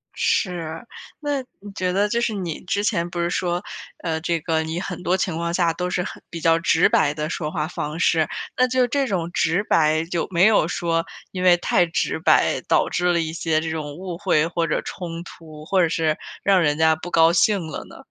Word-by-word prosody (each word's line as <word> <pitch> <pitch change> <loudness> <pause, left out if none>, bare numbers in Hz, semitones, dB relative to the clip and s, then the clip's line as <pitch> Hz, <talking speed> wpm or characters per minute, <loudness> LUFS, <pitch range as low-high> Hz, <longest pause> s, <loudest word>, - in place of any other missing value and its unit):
是， 180 - -1 0.3
那 290 -2 -1 0.2
你 205 0 -10
觉 185 -1 -1
得 205 +2 +2
就 235 +1 0
是 230 -2 0
你 180 -6 -4
之 200 +3 -1
前 175 -5 0
不 175 - -5
是 170 - 0
说， 175 +1 -1 0.4
呃， 160 -2 -1
这 170 -1 0
个 160 0 0
你 160 +2 -3
很 180 -1 -5
多 180 - +2
情 180 -3 -1
况 170 +1 -2
下 170 -2 +2
都 180 0 -3
是 180 0 -1
很 - - -8
比 165 - -6
较 165 0 +3
直 - - +3
白 145 -1 +3
的 155 +1 -3
说 155 -3 -3
话 155 -3 -2
方 155 -1 -5
式， 160 -3 +3 0.3
那 255 0 +4
就 250 0 +2
这 275 +1 0
种 175 -5 -2
直 175 +4 +1
白， 160 -4 +2
有 170 - -1
没 175 +3 +4
有 210 -7 +4
说 165 -1 -1 0.3
因 185 -1 -4
为 180 -1 +7
太 175 - +2
直 165 -1 -1
白， 160 - +3
导 - - +3
致 180 0 +1
了 170 - +2
一 160 -1 -2
些 160 -1 0
这 160 - -3
种 150 -2 -4
误 180 -1 -6
会 170 -5 +2
或 170 -1 -1
者 - - 0
冲 170 -1 -6
突， 155 -2 -12
或 185 +1 +2
者 165 - +3
是 160 -1 0 0.3
让 195 -2 +4
人 150 -1 +1
家 160 0 +4
不 175 +2 -8
高 165 0 +5
兴 190 -2 +2
了 155 - -6
呢？ - - -14
170 Hz, 240 characters per minute, -22 LUFS, 160-185 Hz, 0.4 s, 为